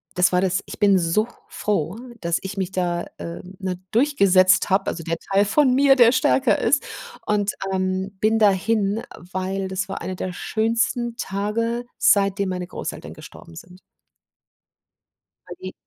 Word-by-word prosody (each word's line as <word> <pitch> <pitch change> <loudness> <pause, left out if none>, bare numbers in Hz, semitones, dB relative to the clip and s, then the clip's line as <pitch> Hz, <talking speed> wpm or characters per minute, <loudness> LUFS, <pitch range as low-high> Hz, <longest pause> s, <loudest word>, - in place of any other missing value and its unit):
das 180 0 +3
war 180 0 +2
das 185 0 0
ich - - -8
bin 200 -2 +4
so 175 +6 +1 0.2
froh, 195 -3 -2 0.2
dass 170 -1 0
ich 190 +1 -5
mich 190 -2 -3
da, 175 -2 -1
äh, 170 - -7 0.2
ne, 185 -2 -4
durchgesetzt 195 -8 +4
hab, 190 +1 +2
also 165 - -3
der 165 +1 -2
Teil 195 +1 +4
von 255 +5 +3
mir, 275 +1 +5
der 240 -3 +6
stärker 260 -1 +2
ist. 280 - +2 0.4
Und, 205 -1 +1 0.2
ähm, 190 +1 -2
bin 220 +1 +3
dahin, 210 +1 +2 0.3
weil 190 +1 -2
das 190 +1 -3
war 195 - -5
einer 185 - -4
der 185 0 -4
schönsten 230 +3 -1
Tage, 230 +4 -2
seitdem 200 -1 +3
meine 180 -1 -4
Großeltern - - -7
gestorben 85 - -13
sind. 180 - -13 1.7
Weil - - -8
die 370 - -7
195 Hz, 155 wpm, -22 LUFS, 185-220 Hz, 1.7 s, der